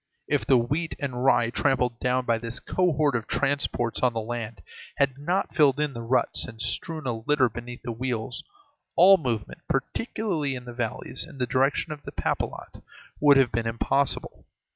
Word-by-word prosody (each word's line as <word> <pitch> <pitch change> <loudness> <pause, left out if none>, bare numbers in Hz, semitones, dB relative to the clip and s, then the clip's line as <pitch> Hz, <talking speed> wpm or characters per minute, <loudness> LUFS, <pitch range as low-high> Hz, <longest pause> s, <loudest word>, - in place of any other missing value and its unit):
If - - 0
the 130 - +6
wheat 145 +8 -1
and 130 -4 -3
rye 120 -3 +4
trampled 125 -3 +1
down 125 0 0
by 115 -1 +1
this 115 +2 -6
cohort 155 -6 +1
of 115 -2 -2
transports 125 -2 0
on 125 -2 +3
the 115 -1 -2
march 115 -1 -5 0.4
had 140 -2 +2
not 180 +7 -1
filled 145 -3 +4
in 150 -2 0
the 115 - -6
ruts 115 +3 +1
and 115 -3 -11
strewn 160 +6 -1
a 120 - 0
litter 130 +4 +2
beneath 120 +2 -8
the 120 - -3
wheels, 120 0 -3 0.5
all 190 +3 +8
movement, 120 - -3
particularly 160 - -1
in 125 -1 -8
the 120 - -8
valleys, 120 0 -3
in - - -11
the 125 - 0
direction 135 +5 +1
of 145 - -12
Papelotte - - -3 0.4
would 145 -1 +6
have 130 -3 +4
been 115 +1 -1
impossible. 120 +4 0
130 Hz, 175 wpm, -26 LUFS, 120-145 Hz, 0.5 s, all